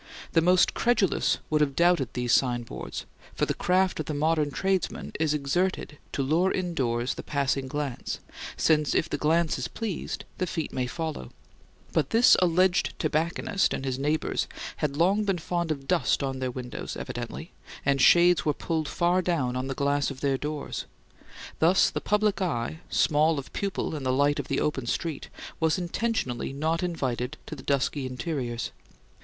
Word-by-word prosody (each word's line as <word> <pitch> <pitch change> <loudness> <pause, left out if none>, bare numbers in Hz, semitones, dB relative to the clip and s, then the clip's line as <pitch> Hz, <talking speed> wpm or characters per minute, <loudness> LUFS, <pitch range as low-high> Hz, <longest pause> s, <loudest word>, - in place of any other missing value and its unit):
The 165 - +4
most 180 +2 +4
credulous 235 -6 +2
would 155 0 +3
have 140 -2 +1
doubted 170 -7 +3
these 125 -1 0
signboards; 120 -3 -1 0.3
for - - +1
the - - -1
craft 185 0 +1
of 155 - -3
the 155 - -2
modern 155 0 +2
tradesman 190 +5 -1
is 155 -1 +2
exerted 150 +2 -1
to 140 - 0
lure 165 +7 +2
indoors 130 -9 -1
the - - -7
passing 135 -2 -1
glance, 140 -2 -3 0.4
since 155 -2 +2
if 160 - +2
the - - -3
glance 160 0 +2
is 125 - -2
pleased 220 -7 -4
the 185 - 0
feet 165 -2 -3
may 125 -1 -1
follow; 155 - -4 0.6
but 150 -4 +1
this 230 +2 +6
alleged 180 +1 +2
tobacconist 165 +4 0
and 135 - -5
his 130 -1 -2
neighbours 150 +3 0 0.3
had 145 -2 -2
long 195 +6 +3
been 195 -3 0
fond 170 0 -2
of 140 -3 -3
dust 175 -5 +2
on 135 -1 -2
their 130 -1 -1
windows, 125 -1 -6
evidently, - - -6 0.3
and 140 -1 +2
shades 175 +3 +6
were 150 -2 +1
pulled 160 -2 -2
far 175 +3 +2
down 155 -9 0
on 130 +1 -2
the 135 - -3
glass 140 0 +1
of 135 -2 -8
their 140 -1 +2
doors. 150 +2 -4 0.7
Thus 175 +4 +4
the - - -3
public 210 -1 +1
eye, 155 -4 -1
small 155 +1 +3
of 140 - -7
pupil 195 -5 -2
in 150 - -4
the 130 -1 0
light 145 +2 +2
of - - -4
the - - 0
open 135 -5 -1
street, 160 +2 -3 0.3
was 160 +1 +2
intentionally 175 - -2
not 160 +4 0
invited 135 -8 -2
to - - -6
the - - -10
dusky 140 0 0
interiors. 125 -3 -3
155 Hz, 170 wpm, -27 LUFS, 135-175 Hz, 0.7 s, this